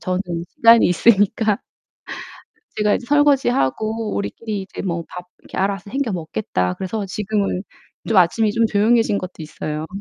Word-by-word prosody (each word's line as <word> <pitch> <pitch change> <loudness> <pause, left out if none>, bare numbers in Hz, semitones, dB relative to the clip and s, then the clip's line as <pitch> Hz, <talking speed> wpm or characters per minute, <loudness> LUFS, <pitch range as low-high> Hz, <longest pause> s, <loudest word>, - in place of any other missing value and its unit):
저는 185 -3 -1 0.3
시간이 230 0 +6
있으니까 205 +2 +3 1.2
제가 210 -1 +2
이제 245 - -4
설거지하고 230 - +1
"우리끼리 210 0 -4
이제 190 - -8
뭐 170 -3 -3
밥 180 - -8
이렇게 - - -12
알아서 195 0 -2
챙겨 265 -3 -1
먹겠다." 160 - -2
그래서 200 +2 -4
지금은 200 -1 -2 0.5
좀 225 - +1
아침이 205 +5 +3
좀 230 +1 +2
조용해진 215 0 +2
것도 185 -1 -6
있어요. 155 0 -5
205 Hz, 340 characters per minute, -20 LUFS, 185-225 Hz, 1.2 s, 시간이